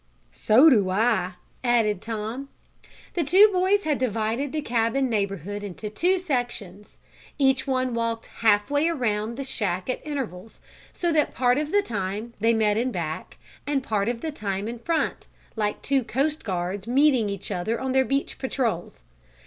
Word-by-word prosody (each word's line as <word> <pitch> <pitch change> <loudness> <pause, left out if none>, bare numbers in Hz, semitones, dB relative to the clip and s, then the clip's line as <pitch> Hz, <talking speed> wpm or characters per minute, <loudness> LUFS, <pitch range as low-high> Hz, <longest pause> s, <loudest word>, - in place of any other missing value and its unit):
"So 245 +9 +5
do 210 -10 +5
I," 190 -2 +1 0.3
added 225 -5 +2
Tom. 225 +5 -5 0.6
The 345 - 0
two 380 +9 +7
boys 380 +3 +2
had 300 -3 0
divided 230 +3 -1
the 305 -1 -2
cabin 240 +2 +1
neighborhood 200 -1 -2
into 205 +2 -6
two 355 - +2
sections. 240 - -4 0.4
Each 265 -1 +2
one 255 -2 0
walked 230 -1 -2 0.2
half 210 +2 +3
way 290 +2 +2
around 235 -7 -1
the 275 - -3
shack 195 -6 -2
at - - -5
intervals, 230 -9 -5 0.3
so 345 -1 -1
that 310 -2 +1
part 250 +1 +3
of 300 0 -3
the 410 0 +3
time 210 - -4
they 225 +2 +3
met 215 -2 +2
in 250 +3 0
back, 165 -6 -5 0.3
and 280 -2 0
part 210 -2 0
of 235 -1 -3
the 320 - -3
time 200 -6 -3
in 235 +1 -5
front, 330 +6 -1 0.3
like 210 -2 -2
two 270 -2 +1
coast 280 +7 -1
guards 190 +1 -3
meeting 255 -4 +3
each 200 +1 -5
other 200 +5 -1
on 265 0 -2
their 265 0 +4
beach 275 +2 -2
patrols. 230 - -2
230 Hz, 165 wpm, -25 LUFS, 210-275 Hz, 0.6 s, two